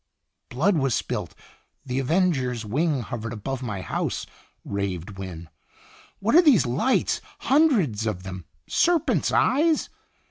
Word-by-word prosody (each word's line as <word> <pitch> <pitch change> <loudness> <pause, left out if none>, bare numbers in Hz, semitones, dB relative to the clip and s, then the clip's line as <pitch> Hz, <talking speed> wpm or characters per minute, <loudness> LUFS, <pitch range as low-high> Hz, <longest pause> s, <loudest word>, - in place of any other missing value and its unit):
"Blood 165 +10 +2
was 135 -5 +1
spilt - - -3 0.5
the 130 0 -2
avenger's 135 - +1
wing 145 +5 0
hov 120 +1 -5
ered 115 +1 -5
above 130 +4 -4
my 105 -7 -4
house," - - -3 0.4
raved 95 -1 -4
Wynne. 85 -3 -7 0.7
"What 215 +3 0
are 340 - +9
these 280 - +5
lights, 135 - +1 0.2
hundreds 205 - +2
of 90 -4 -3
them 95 -2 -7 0.2
serpent's 340 -3 +2
eyes? 310 +4 +2
130 Hz, 130 wpm, -25 LUFS, -, 0.7 s, are